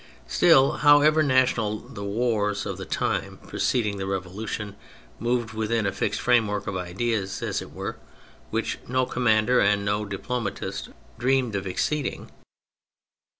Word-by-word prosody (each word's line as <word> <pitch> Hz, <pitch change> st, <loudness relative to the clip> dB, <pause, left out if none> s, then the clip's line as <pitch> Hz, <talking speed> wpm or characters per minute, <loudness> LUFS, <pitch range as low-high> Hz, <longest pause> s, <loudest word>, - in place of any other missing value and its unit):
Still, 135 Hz, -, +5 dB
however 150 Hz, +1 st, +6 dB
national, 130 Hz, -6 st, +2 dB
the 115 Hz, -3 st, -9 dB
wars 105 Hz, -1 st, 0 dB
of -, -, -4 dB
the -, -, -7 dB
time -, -, -1 dB
preceding 105 Hz, -5 st, 0 dB
the 95 Hz, 0 st, -4 dB
Revolution 100 Hz, +2 st, -4 dB, 0.4 s
moved 120 Hz, -1 st, -1 dB
within 110 Hz, 0 st, 0 dB
a 100 Hz, -, +1 dB
fixed 100 Hz, +1 st, -1 dB
framework 110 Hz, -5 st, +2 dB
of 100 Hz, -, -3 dB
ideas, 95 Hz, +3 st, -2 dB
as -, -, -1 dB
it -, -, -10 dB
were, -, -, -5 dB, 0.5 s
which -, -, -2 dB
no 130 Hz, +1 st, +1 dB
commander 120 Hz, 0 st, +2 dB
and 100 Hz, 0 st, +2 dB
no 105 Hz, +1 st, 0 dB
diplomatist 100 Hz, +1 st, -4 dB, 0.3 s
dreamed 130 Hz, -3 st, +1 dB
of 95 Hz, -1 st, -2 dB
exceeding. 140 Hz, +9 st, -2 dB
110 Hz, 135 wpm, -25 LUFS, 100-125 Hz, 0.5 s, however